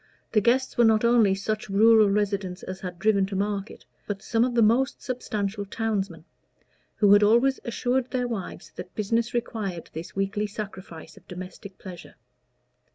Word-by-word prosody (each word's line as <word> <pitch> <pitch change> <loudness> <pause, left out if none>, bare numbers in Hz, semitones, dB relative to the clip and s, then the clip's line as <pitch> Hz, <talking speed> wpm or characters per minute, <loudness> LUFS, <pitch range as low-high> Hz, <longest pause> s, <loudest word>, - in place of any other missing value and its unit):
The 215 - +3
guests 250 +4 +1
were - - +7
not 220 0 +4
only 230 -5 +4
such 215 +2 -3
rural 215 +1 +5
residents 200 -2 -1
as 185 0 -6
had 180 -2 -7
driven 200 0 +2
to 195 - -5
market, 200 +1 -3 0.2
but 200 -2 -4
some 230 0 +1
of 245 -1 -1
the 230 - +5
most 240 +5 +2
substantial 210 -5 -3
townsmen, 200 -6 -3 0.7
who 205 -2 +5
had 205 - +6
always 235 +6 +4
assured 245 +2 -1
their 250 -1 -1
wives 220 -6 -6
that 180 0 -9
business 230 +3 -1
required 210 -7 -4
this 160 +2 -8
weekly 195 +2 -1
sacrifice 190 -6 -8
of - - -18
domestic 185 +2 -9
pleasure. 180 -3 -11
205 Hz, 160 wpm, -26 LUFS, 195-230 Hz, 0.7 s, were